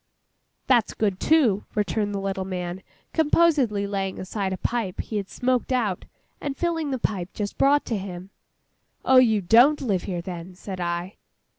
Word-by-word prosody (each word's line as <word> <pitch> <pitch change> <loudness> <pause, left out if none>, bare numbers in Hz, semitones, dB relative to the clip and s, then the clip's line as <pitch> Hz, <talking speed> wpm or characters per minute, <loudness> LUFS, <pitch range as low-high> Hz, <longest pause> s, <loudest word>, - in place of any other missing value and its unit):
'That's 240 -4 +2
good, 200 -4 0
too!' 255 -11 +3
returned 210 0 0
the 200 - -2
little 195 -1 -2
man, 180 -1 -4 0.3
composedly 295 -10 +3
laying 195 -1 -3
aside 190 +1 -3
a 190 - -2
pipe 220 -3 -2
he 215 - -3
had 195 -2 -4
smoked 255 0 0
out, 220 -8 0 0.4
and 280 -1 -4
filling 330 -3 -1
the 265 - -1
pipe 190 -6 -2
just 205 -1 -3
brought 285 +1 +4
to 230 - -2
him. 185 0 -8 0.7
'Oh, 260 - +6
you 225 -5 +5
don't 240 +11 +5
live 200 -9 -1
here 175 -2 -3
then?' 180 0 -7
said 190 0 -7
I. 175 +2 -3
205 Hz, 165 wpm, -24 LUFS, 190-255 Hz, 0.7 s, Oh